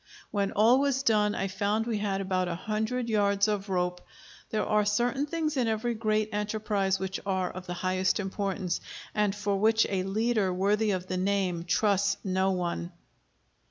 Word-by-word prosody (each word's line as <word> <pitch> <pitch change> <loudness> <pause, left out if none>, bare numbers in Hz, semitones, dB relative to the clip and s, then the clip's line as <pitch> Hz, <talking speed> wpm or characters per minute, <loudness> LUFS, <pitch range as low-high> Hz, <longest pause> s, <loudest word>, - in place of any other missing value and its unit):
When 200 -2 0
all 230 +5 +5
was 275 -1 +1
done 210 -3 +3
I 195 - -1
found 205 +3 0
we 225 -3 -1
had 195 -2 -1
about 185 -1 0
a 170 - -2
hundred 220 +6 -2
yards 200 -2 +2
of 205 -1 -2
rope. 180 -1 -1 0.5
There 215 -1 0
are 210 0 +2
certain 240 +7 +1
things 310 -2 -2
in 245 -3 +2
every 225 +2 0
great 215 -1 0
enterprise 210 -2 0
which 190 0 -3
are 190 -2 -1
of 185 0 -9
the 175 - -4
highest 185 +2 0
importance, 195 -2 -2 0.3
and 210 -2 +1
for 205 -1 -1
which 220 +2 +4
a 190 -2 +1
leader 210 +1 +1
worthy 205 +4 +1
of 185 -2 -1
the 185 0 -3
name 185 -3 0
trusts 200 +1 +2
no 190 0 +1
one. 175 -1 -2
200 Hz, 175 wpm, -28 LUFS, 190-215 Hz, 0.5 s, all